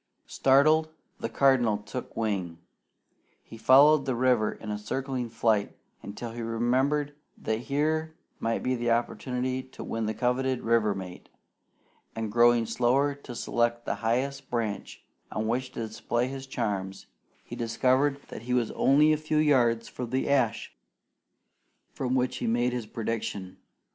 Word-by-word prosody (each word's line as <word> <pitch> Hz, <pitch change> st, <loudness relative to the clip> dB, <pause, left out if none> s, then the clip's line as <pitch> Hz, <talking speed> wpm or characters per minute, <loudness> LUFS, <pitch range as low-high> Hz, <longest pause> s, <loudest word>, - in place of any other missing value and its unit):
Startled, 155 Hz, +4 st, +3 dB, 0.3 s
the 115 Hz, -, -3 dB
Cardinal 120 Hz, -3 st, +3 dB
took 105 Hz, +4 st, -8 dB
wing. 95 Hz, -7 st, -2 dB, 0.9 s
He -, -, -12 dB
followed 140 Hz, +5 st, +6 dB
the 130 Hz, -, 0 dB
river 125 Hz, -3 st, +2 dB
in 105 Hz, -, -7 dB
a 105 Hz, -, -3 dB
circling 130 Hz, +3 st, -3 dB
flight 110 Hz, -2 st, 0 dB, 0.2 s
until 115 Hz, +3 st, -7 dB
he 120 Hz, +1 st, -6 dB
remembered 130 Hz, +6 st, 0 dB, 0.2 s
that 110 Hz, 0 st, -2 dB
here 155 Hz, +3 st, 0 dB, 0.2 s
might 115 Hz, 0 st, -1 dB
be 130 Hz, -, +1 dB
the 120 Hz, -1 st, -1 dB
opportunity 125 Hz, +2 st, -1 dB
to 130 Hz, -, -11 dB
win 115 Hz, -1 st, -3 dB
the 110 Hz, -, -2 dB
coveted 130 Hz, +1 st, 0 dB
river 115 Hz, -3 st, +2 dB
mate, 90 Hz, -2 st, -8 dB, 0.9 s
and 110 Hz, -2 st, -3 dB
going 120 Hz, 0 st, +4 dB
slower 125 Hz, +5 st, +2 dB
to 140 Hz, -3 st, -10 dB
select 120 Hz, 0 st, 0 dB
the -, -, -1 dB
highest 130 Hz, +4 st, -1 dB
branch 115 Hz, -4 st, -3 dB, 0.3 s
on 110 Hz, 0 st, -2 dB
which 125 Hz, +2 st, -1 dB
to 115 Hz, -, -3 dB
display 120 Hz, +3 st, -2 dB
his 135 Hz, 0 st, -7 dB
charms, 100 Hz, -6 st, -3 dB, 0.4 s
he -, -, -8 dB
discovered 130 Hz, +4 st, +1 dB
that -, -, -8 dB
he 125 Hz, +2 st, -1 dB
was 120 Hz, -3 st, +1 dB
only 150 Hz, +3 st, +4 dB
a -, -, +1 dB
few 155 Hz, 0 st, -2 dB
yards 120 Hz, -6 st, +3 dB
from 125 Hz, -1 st, -6 dB
the 130 Hz, +2 st, -1 dB
ash 125 Hz, -5 st, +1 dB, 1.2 s
from 130 Hz, -1 st, -1 dB
which 125 Hz, 0 st, 0 dB
he -, -, -3 dB
had 115 Hz, -, +1 dB
made 120 Hz, +1 st, +1 dB
his 120 Hz, -3 st, -4 dB
prediction. 105 Hz, -5 st, -4 dB
120 Hz, 155 wpm, -28 LUFS, 115-135 Hz, 1.2 s, followed